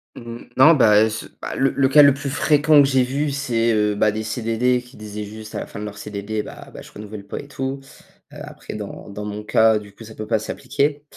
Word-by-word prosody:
Mmh - - -10
mh. 115 0 -9
Non, 150 +6 +8
bah, 110 -6 +5
ce 110 0 -6 0.2
bah, - - -5
le 135 - +2
le 135 - +2
cas 145 +3 +7
le 140 -1 +7
plus 140 +1 -5
fréquent 150 +1 +4
que 140 - +4
j'ai 130 -2 +3
vu, 140 +4 -1
c'est, 120 -4 0
heu, 105 -1 +1
bah, 105 +1 +2
des 110 +1 -4
CDD 115 +2 0
qui 125 +1 -17
disaient 105 0 -7
juste 110 +1 -10
à - - -2
la - - -6
fin - - -9
de 105 - -5
leur 105 -1 -8
CDD, 105 +1 -4
bah, - - -11
bah, - - -9
je - - -14
renouvelle 105 -1 -9
pas 100 - -6
et - - -10
tout. 135 -1 -4 0.5
Heu, - - -10
après - - -9
dans 105 0 -8
dans 105 +1 -7
mon 105 0 -6
cas, 110 0 +3
du 105 -1 -14
coup, 115 - -13
ça 110 0 -11
peut 110 - -7
pas 110 -1 +1
s'appliquer. 140 +6 -2
115 Hz, 260 wpm, -21 LUFS, 105-135 Hz, 0.5 s, Non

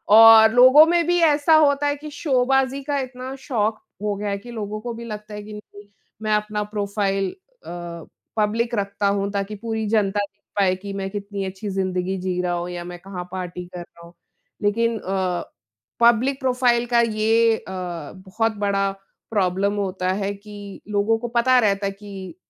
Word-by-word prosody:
और 225 0 +9
लोगों 255 +5 +8
में 340 0 +2
भी 350 0 +3
ऐसा 305 -1 +4
होता 290 -2 +4
है 285 - +1
कि 300 +1 -9
शोबाज़ी 270 -1 +1
का 285 0 -1
इतना 255 0 -6
शौक़ 225 -5 -1 0.3
हो 210 -1 0
गया 205 +1 -3
है 200 - -1
कि 240 +5 -11
लोगों 215 -2 -5
को 240 0 -5
भी 235 +1 -8
लगता 210 -1 -8
है 210 - -6
कि 210 +1 -10
नहीं, 205 -1 -12 0.3
मैं 215 -1 0
अपना 210 0 -1
प्रोफ़ाइल 200 -2 -1 0.4
अ, - - -9 0.7
पब्लिक 230 +3 0
रखता 200 -1 -1
हूँ, 200 0 0
ताकि 200 +1 -3
पूरी 220 +1 -3
जनता 205 -2 +1
देख 200 0 -5 0.2
पाए 185 -2 +3
कि 200 +2 -8
मैं 195 -1 -3
कितनी 200 0 -5
अच्छी 190 +2 -6
ज़िंदगी 190 -1 -1
जी 180 -1 -2
रहा 180 -1 -1
हूँ 175 0 -3
या 175 -1 -5
मैं 175 0 -8
कहाँ 185 -1 -7
पार्टी 180 -1 -5
कर 180 - -6
रहा 170 0 -14
हूँ। 170 - -16 0.5
लेकिन 230 +2 +1
अ, 185 -2 -2 0.6
पब्लिक 240 +3 +4
प्रोफ़ाइल 250 -2 +2
का 235 - +6
ये 225 0 +3
अ, - - -14
बहुत 185 +5 -4
बड़ा 195 -1 +1 0.4
प्रॉब्लम 200 -1 +1
होता 185 -2 -2
है 200 +1 -2
कि 205 -1 -11
लोगों 210 +2 +2
को 240 +2 -5
पता 255 +2 +4
रहता 200 -2 +1
है 195 - 0
कि 195 -3 -9
210 Hz, 185 wpm, -22 LUFS, 195-235 Hz, 0.7 s, और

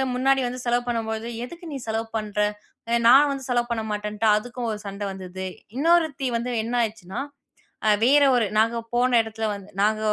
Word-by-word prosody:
முன்னாடி 270 +1 +3
வந்து 250 +1 -5
செலவு 240 0 +1
பண்ணும்போது, 225 -1 -2 0.2
எதுக்கு 340 +7 -11
"நீ - - -3
செலவு 225 +1 -1
பண்ற? 210 -1 -4 0.5
அ - - 0
நான் 275 +4 +7
வந்து 275 -1 -4
செலவு 240 -1 +1
பண்ண 230 -1 0
மாட்டேன்னுட்டு," 210 +1 -1
அதுக்கும் 240 +2 -3
ஒரு 210 - -4
சண்டை 200 +1 -5
வந்தது. 190 0 -6 0.3
இன்னொருத்தி 315 -3 +2
வந்து 240 +2 -3
என்ன 235 +2 -3
ஆயிடுச்சுன்னா, 215 -2 -3 0.7
அ - - +6 0.2
வேற 285 +3 +6
ஒரு, 240 -3 +3
நாங்க 230 +2 +2 0.2
போன 245 0 +3
இடத்துல 220 0 -4
வந்து 200 -1 -9
நாங்க 215 +1 +2
230 Hz, 180 wpm, -24 LUFS, 215-250 Hz, 0.7 s, நான்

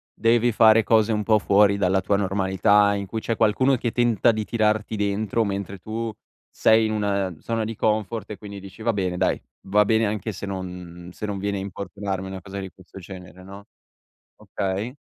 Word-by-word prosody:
devi 120 +1 +3
fare 110 0 +6
cose 110 +1 +3
un 105 -1 0
po' 110 -1 +3
fuori 100 0 +4
dalla 95 -1 +2
tua 100 +2 +1
normalità, 100 +1 +2
in 100 -1 -3
cui 110 +4 -4
c'è 115 +1 -2
qualcuno 125 +5 +3
che 120 -1 -2
tenta 120 -1 +3
di 110 -1 -3
tirarti 110 0 0
dentro, 105 +2 0
mentre 100 -1 -4
tu 110 +3 -4 0.4
sei 110 0 +3
in 110 - -1
un, 105 -1 -1
ehm, 100 -5 -1
zona 115 -1 -2
di 115 - -5
comfort 110 0 -1
e 105 - -6
quindi 100 -1 -9
dici: 100 +3 -12
"Va 115 +1 +1
bene, 90 -3 -2
dai, - - 0 0.3
va 105 +2 +4
bene 110 +1 +2
anche 105 +1 -2
se 95 - -7
non 90 -2 -7
se 105 - -6
non 100 -2 -4
viene 100 +1 -2
a - - -4
importunarmi 95 0 -5
una 95 0 -7
cosa 95 +2 -7
di 95 - -6
questo 95 +1 -14
genere", 90 0 -11
no? 100 +1 -11 0.7
Okay. 100 +6 -4
100 Hz, 200 wpm, -24 LUFS, 95-110 Hz, 0.7 s, fare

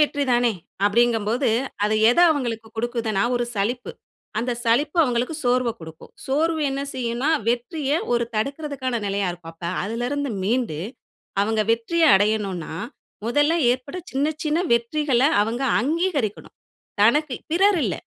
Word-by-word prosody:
வெற்றிதானே, 255 -5 +2 0.3
அப்பிடிங்கம்போது, 230 +3 +2 0.4
அது 210 +1 +1 0.2
எத 245 - 0
அவுங்களுக்கு 235 -7 -2
குடுக்குதுன்னா, 225 -3 -1
ஒரு 240 - 0
சலிப்பு. 240 +5 -2 0.5
அந்த 245 +2 -1
சலிப்பு 285 +8 +1
அவுங்களுக்கு 250 +2 0
சோர்வ 245 0 +2
குடுக்கும். 160 -1 -12
சோர்வு 315 +4 +1
என்ன 270 +1 -3
செய்யுன்னா, 250 +3 -1 0.2
வெற்றிய 265 +5 -1 0.2
ஒரு 235 0 +1
தடுக்குறதுக்கான 270 0 -2
நிலையா 200 -1 0
இருக்கும். 170 -1 -11
அப்ப 170 +1 -7 0.2
அதுல 230 +4 -3
இருந்து 285 -1 -2
மீண்டு, 220 -5 0 0.6
அவுங்க 220 +1 +1
வெற்றிய 235 +9 0
அடையணுனா, 200 -5 -1 0.5
முதல்ல 290 +6 +2 0.2
ஏற்பட்ட 260 +7 -3
சின்ன, 285 +3 +1
சின்ன 305 +1 +1 0.2
வெற்றிகள 250 +2 +1 0.2
அவங்க 230 +5 -2 0.2
அங்கீகரிக்கணும். 290 - -1 0.5
தனக்கு 280 +5 +3 0.2
பிறர் 385 +2 +4
இல்ல. 200 - -1
240 Hz, 125 wpm, -23 LUFS, 220-285 Hz, 0.6 s, பிறர்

